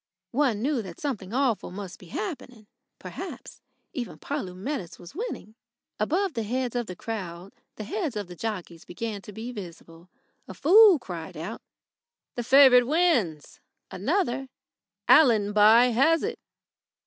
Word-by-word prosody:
One 245 Hz, -5 st, +1 dB
knew 275 Hz, -3 st, 0 dB
that 185 Hz, -5 st, -10 dB
something 215 Hz, -10 st, -4 dB
awful 250 Hz, -3 st, 0 dB
must 190 Hz, 0 st, -8 dB
be 180 Hz, -, -14 dB
happening. 275 Hz, -, -6 dB, 0.3 s
Perhaps -, -, -9 dB, 0.3 s
even 250 Hz, -7 st, -5 dB
Polumetis 195 Hz, -, -5 dB
was 175 Hz, -1 st, -13 dB
winning. 410 Hz, -, -6 dB, 0.5 s
Above 340 Hz, -, 0 dB
the 230 Hz, -, -2 dB
heads 245 Hz, +3 st, -2 dB
of 240 Hz, -2 st, -1 dB
the 180 Hz, -, -7 dB
crowd 185 Hz, -4 st, -6 dB, 0.2 s
the 215 Hz, -, -6 dB
heads 315 Hz, -, -3 dB
of 190 Hz, -4 st, -5 dB
jockeys 175 Hz, -5 st, -5 dB
began 210 Hz, +2 st, -5 dB
to 210 Hz, -, -11 dB
be 225 Hz, +4 st, -7 dB
visible. 170 Hz, -4 st, -11 dB, 0.4 s
A -, -, -9 dB
fool 400 Hz, +2 st, +7 dB
cried 175 Hz, -, -8 dB
out: 175 Hz, +9 st, -6 dB, 0.7 s
"The 245 Hz, -, -3 dB
favourite 250 Hz, -1 st, +7 dB
wins." 260 Hz, -, +1 dB, 0.3 s
Another: 270 Hz, -, -1 dB, 0.6 s
"Allenby 220 Hz, -2 st, +6 dB
has 310 Hz, +7 st, +3 dB
it." 460 Hz, +1 st, -3 dB
230 Hz, 135 wpm, -26 LUFS, 195-280 Hz, 0.7 s, fool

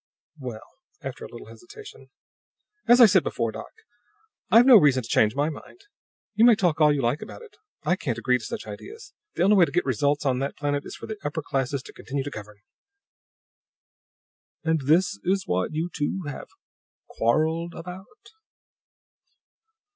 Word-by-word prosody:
"Well," 120 Hz, -5 st, -7 dB, 0.4 s
after -, -, -7 dB
a -, -, -8 dB
little -, -, -11 dB
hesitation, 420 Hz, +4 st, -14 dB, 0.8 s
"as 240 Hz, +1 st, +6 dB
I 240 Hz, -, +10 dB
said 195 Hz, -4 st, +5 dB
before, 115 Hz, -6 st, -2 dB
doc, 110 Hz, +1 st, -9 dB, 0.8 s
I've 235 Hz, +2 st, +7 dB
no 260 Hz, -3 st, +9 dB
reason 140 Hz, -8 st, +3 dB
to -, -, -9 dB
change 110 Hz, 0 st, +2 dB
my 145 Hz, +3 st, 0 dB
mind. 365 Hz, -, -13 dB, 0.5 s
You 220 Hz, +1 st, +2 dB
may 235 Hz, -1 st, +7 dB
talk 175 Hz, -6 st, 0 dB
all 150 Hz, -1 st, +6 dB
you 145 Hz, -3 st, -1 dB
like 120 Hz, +6 st, 0 dB
about -, -, -10 dB
it 430 Hz, -3 st, -16 dB, 0.3 s
I 180 Hz, -, +1 dB
can't 120 Hz, -9 st, -3 dB
agree 125 Hz, +1 st, +1 dB
to -, -, -12 dB
such -, -, -6 dB
ideas. 405 Hz, -, -10 dB, 0.2 s
The -, -, +1 dB
only 205 Hz, +2 st, +5 dB
way 180 Hz, -, +6 dB
to 140 Hz, -, -8 dB
get 175 Hz, +4 st, 0 dB
results 140 Hz, +4 st, 0 dB
on 130 Hz, -2 st, +1 dB
that 140 Hz, +1 st, -4 dB
planet 145 Hz, -1 st, -2 dB
is -, -, -8 dB
for -, -, -9 dB
the 220 Hz, -1 st, -7 dB
upper 145 Hz, +2 st, -3 dB
classes 135 Hz, -1 st, -2 dB
to -, -, -13 dB
continue 135 Hz, 0 st, -5 dB
to 145 Hz, -, -6 dB
govern." 105 Hz, -2 st, -10 dB, 2.1 s
"And 160 Hz, -2 st, +1 dB
this 190 Hz, +7 st, +2 dB
is 190 Hz, +1 st, 0 dB
what 90 Hz, +1 st, -1 dB
you 160 Hz, +2 st, -1 dB
two 165 Hz, +5 st, -2 dB
have 145 Hz, -2 st, -7 dB, 0.6 s
quarreled 160 Hz, +8 st, 0 dB
about?" 190 Hz, -, -11 dB
150 Hz, 175 wpm, -25 LUFS, 130-195 Hz, 2.1 s, I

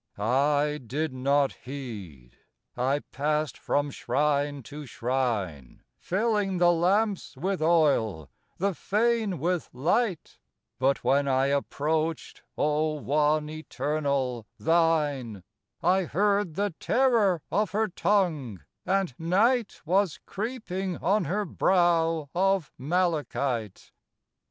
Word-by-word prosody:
I 145 Hz, +7 st, +1 dB
did 145 Hz, +5 st, -3 dB
not 140 Hz, +2 st, +2 dB
heed; 105 Hz, -, -9 dB, 0.4 s
I 135 Hz, +4 st, 0 dB
passed 150 Hz, 0 st, -1 dB
from 145 Hz, 0 st, -1 dB
shrine 145 Hz, +2 st, 0 dB
to 145 Hz, +5 st, -9 dB
shrine, 115 Hz, -, -2 dB, 0.2 s
Filling 205 Hz, -1 st, 0 dB
the 175 Hz, 0 st, +5 dB
lamps 190 Hz, -1 st, +1 dB
with 190 Hz, +4 st, -2 dB
oil, 140 Hz, -, +2 dB, 0.3 s
the 195 Hz, +2 st, 0 dB
Fane 215 Hz, 0 st, 0 dB
with 175 Hz, +3 st, -1 dB
light; 175 Hz, -, -1 dB, 0.4 s
But 135 Hz, +1 st, +1 dB
when 140 Hz, +1 st, +2 dB
I 130 Hz, 0 st, +2 dB
approached, 155 Hz, +3 st, -1 dB, 0.2 s
O 150 Hz, +1 st, +1 dB
One 150 Hz, +1 st, +1 dB
Eternal, 140 Hz, -6 st, -2 dB
thine, 150 Hz, -, +1 dB, 0.4 s
I 185 Hz, +2 st, +3 dB
heard 200 Hz, 0 st, +1 dB
the 200 Hz, -1 st, -1 dB
terror 225 Hz, -, +2 dB
of 210 Hz, -1 st, +1 dB
her 215 Hz, +5 st, 0 dB
tongue, 170 Hz, -, 0 dB, 0.3 s
and 190 Hz, -5 st, +1 dB
Night 210 Hz, +8 st, +1 dB
Was 185 Hz, 0 st, +1 dB
creeping 195 Hz, -5 st, -4 dB
on 195 Hz, 0 st, +1 dB
her 200 Hz, +7 st, -1 dB
brow 165 Hz, -4 st, +2 dB
of 190 Hz, -3 st, +1 dB
malachite. 140 Hz, -, -1 dB
155 Hz, 105 wpm, -27 LUFS, 140-190 Hz, 0.4 s, the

